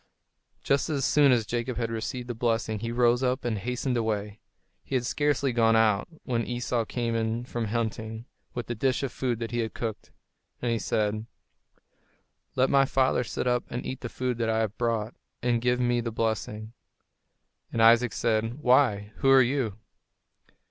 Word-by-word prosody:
Just 140 +3 +1
as 140 -4 0
soon 145 -2 +5
as 120 -3 +3
Jacob 120 +2 -3
had 115 -1 -2
received 120 +2 -4
the 120 - -3
blessing 115 -2 -1
he 115 +2 -3
rose 120 +1 +3
up 130 0 0
and 110 -4 -1
hastened 125 +4 -2
away. 105 -2 -2 0.4
He 135 - -4
had 125 -2 +1
scarcely 140 -2 +1
gone 115 -1 +4
out, 110 -3 +3 0.2
when 120 -3 -1
Esau 120 -1 -1
came 120 0 -2
in 115 +1 -1
from 120 -2 -3
hunting, 110 0 -3 0.3
with 120 -1 -3
the 120 - -3
dish 130 +4 0
of 135 - -2
food 125 -3 -1
that 115 0 -5
he 120 - -1
had 110 -1 -2
cooked. 115 -3 -5 0.5
And 120 - -1
he 115 - 0
said: 110 +1 -1 1.3
"Let 130 +1 +3
my 135 -1 +5
father 130 -2 +2
sit 115 - -4
up 125 -1 +1
and 125 - -4
eat 130 0 -5
the 120 - -4
food 125 -1 -2
that 115 -1 0
I 110 0 +2
have 110 -1 -2
brought, 115 -1 -1 0.3
and 120 -1 +1
give 125 +1 +1
me 120 -1 +2
the 115 - -3
blessing." 110 0 -2 1.0
And - - -2
Isaac 115 +1 +5
said, 115 +1 0
"Why, 125 -7 +2
who 135 - +2
are 135 -1 +8
you?" 120 -5 -1
120 Hz, 185 wpm, -27 LUFS, 110-125 Hz, 1.3 s, are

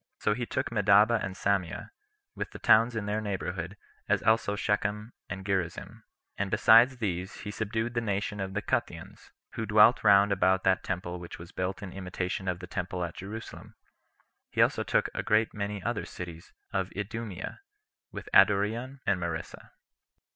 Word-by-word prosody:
So 105 - +1
he 120 +2 -4
took - - -2
Medaba 105 +1 +4
and 95 0 -4
Samea, 95 -3 -1 0.4
with - - -5
the - - -10
towns 115 +2 +4
in 110 -2 -2
their 105 +1 -1
neighborhood, 95 -2 -4 0.3
as - - +2
also 110 -2 +2
Shechem, 105 +2 -1 0.2
and 95 +1 -6
Gerizzim; 95 -4 -3 0.4
and 100 -1 -1
besides 120 +6 +6
these, 95 -1 -3
[he 105 -1 -5
subdued] 110 +3 -2
the 120 - 0
nation 105 -1 -2
of 95 0 -4
the 105 - -1
Cutheans, - - -3 0.2
who 110 -2 -4
dwelt 105 +3 +6
round 100 -1 +6
about 95 -1 +2
that 95 -1 +2
temple 90 -1 -4
which 85 - -9
was 85 +2 -11
built 95 +2 -3
in 95 - -7
imitation 95 0 -4
of 90 -2 0
the - - -6
temple 90 0 -3
at 85 - -4
Jerusalem; 105 +4 -9 0.7
he - - -6
also - - +4
took - - +1
a - - -2
great 110 +1 +2
many 100 -1 -4
other 120 -2 -2
cities 85 -2 -9 0.2
of 95 0 -1
Idumea, 105 -2 -5 0.5
with - - -8
Adoreon 110 +7 +3
and 95 -2 +2
Marissa. 85 -2 -5
100 Hz, 170 wpm, -29 LUFS, 95-110 Hz, 0.7 s, besides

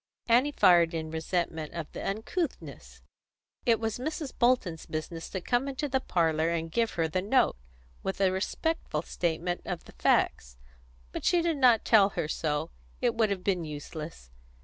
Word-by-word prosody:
Annie 245 +5 +4
fired 170 - +5
in 160 -1 -4
resentment 160 -1 -2
of 165 -3 -5
the - - -6
uncouthness. 220 - -4 0.6
It 230 -2 +4
was 225 0 -2
Mrs. 300 +1 -4
Bolton's 235 -10 +1
business 165 +1 -5
to 190 - -4
come 245 +7 0
into 275 +2 -2
the 265 -1 +1
parlour 165 -7 +1
and 165 -1 -2
give 230 +4 +1
her 165 -1 +1
the 185 +4 -1
note, 220 +7 +3 0.5
with 195 - -3
a 190 -1 +3
respectful 190 - -2
statement 175 +1 -2
of 175 -2 -4
the - - -14
facts. - - +1 0.5
But - - -5
she 345 -1 +3
did 335 -3 +1
not 245 -5 +5
tell 205 -3 +6
her - - 0
so; 155 0 -2 0.3
it 245 -2 +1
would 225 -2 +2
have 195 -2 -2
been 185 -3 0
useless. 150 - -8
185 Hz, 170 wpm, -29 LUFS, 160-240 Hz, 0.6 s, tell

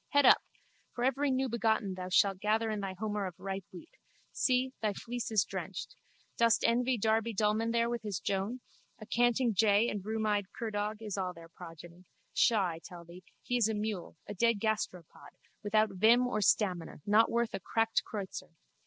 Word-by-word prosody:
Head 285 -1 +5
up! - - +7 0.5
For 245 - -2
every 270 +2 +1
newbegotten 235 -6 0
thou 185 0 -6
shalt 195 +1 +3
gather 215 +2 0
thy 195 -2 -4
homer 210 -1 -2
of 180 - -8
ripe 195 -1 -5
wheat. 175 -3 -12 0.4
See, 255 0 +1
thy 215 -2 0
fleece 240 +3 -5
is 215 -4 +3
drenched. - - -6 0.4
Dost 230 -1 +3
envy 245 +2 +2
Darby 220 +1 +1
Dullman 215 +2 +1
there 235 0 +2
with 235 -1 -3
his 205 -4 -3
Joan? 200 +6 -2 0.4
A 215 - -10
canting 240 +1 +2
jay 205 +2 +4
and 205 - -3
a - - -13
rheumeyed 215 -2 -1
curdog 215 -1 -3
is 205 -2 -4
all 185 -1 -2
their 165 0 -13
progeny. 170 +1 -12 0.3
Pshaw, 220 -6 +3
I 165 -2 -4
tell 175 -3 -11
thee! 175 +2 -13 0.2
He 245 - 0
is 225 -2 +3
a 220 - -1
mule, 210 -5 -4
a - - -6
dead 230 +2 +2
gasteropod, 200 -6 -4 0.3
without 215 0 +2
vim 225 +6 +4
or 245 -4 -1
stamina, 180 -7 +1
not 215 +2 +4
worth 235 -1 0
a 195 - -3
cracked 225 +4 0
kreutzer. 195 -5 -7
215 Hz, 180 wpm, -31 LUFS, 195-230 Hz, 0.5 s, up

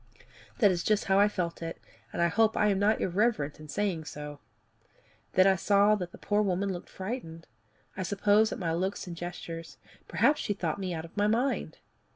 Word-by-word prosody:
That 205 - +5
is 175 -1 -1
just 215 -1 +1
how 195 0 +3
I 205 - +6
felt 180 -5 -3
it, 165 0 -5 0.3
and - - 0
I - - +5
hope 220 +5 +2
I 210 - +4
am 195 -1 +1
not 210 +2 +3
irreverent 185 -6 0
in 155 - -10
saying 165 0 -2
so. 150 -1 -7 0.9
Then 185 - +5
I 195 0 +5
saw 200 +3 +4
that 180 -4 -2
the - - -12
poor 205 0 +1
woman 195 0 0
looked 175 - -8
frightened 185 -5 -6 0.5
I 190 - -4
suppose 205 +3 +3
at - - -3
my 165 -4 -1
looks 185 +4 -2
and 175 -2 -7
gestures 165 -3 -7 0.3
perhaps 285 +7 +2
she 205 - -1
thought 170 -2 -2
me 190 -2 -3
out 160 -1 -4
of 165 - -15
my 205 0 +2
mind. 240 +6 0
190 Hz, 200 wpm, -29 LUFS, 170-210 Hz, 0.9 s, I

